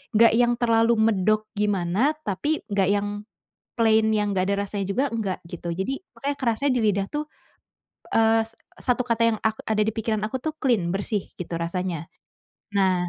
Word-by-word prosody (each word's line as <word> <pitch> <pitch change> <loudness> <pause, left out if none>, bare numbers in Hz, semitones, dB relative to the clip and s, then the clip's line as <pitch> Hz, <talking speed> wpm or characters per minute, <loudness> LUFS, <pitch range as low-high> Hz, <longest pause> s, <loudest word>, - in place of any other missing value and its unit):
nggak 230 +1 +6
yang 240 +1 +4
terlalu 230 -1 +3
medok 215 0 +2
gimana, 205 - +1
tapi 295 +11 -1
nggak 200 -3 +1
yang 205 0 +1 0.7
plain 220 -1 +3
yang 205 -2 0
nggak 185 - +2
ada - - +1
rasanya 200 0 -3
juga 200 +8 0
nggak 220 -6 -2
gitu, 170 0 -5
jadi 190 +10 -2 0.2
makanya 280 0 -3
kerasanya 255 +2 +1
di - - +2
lidah 200 -2 +2
tuh, 300 0 -3 0.9
eee, 225 0 +5
s 230 - -13 0.2
satu 250 0 +1
kata 235 -1 -1
yang - - -8
ak 220 0 0
ada 215 -1 +2
di 220 - 0
pikiran 215 -1 -2
aku 240 +5 -2
tuh 310 +4 -3
clean, 235 - +1
bersih 200 +1 -2
gitu 175 -1 -6
rasanya. 170 -1 -3 0.7
Nah, 185 -2 +2
215 Hz, 175 wpm, -24 LUFS, 195-230 Hz, 0.9 s, nggak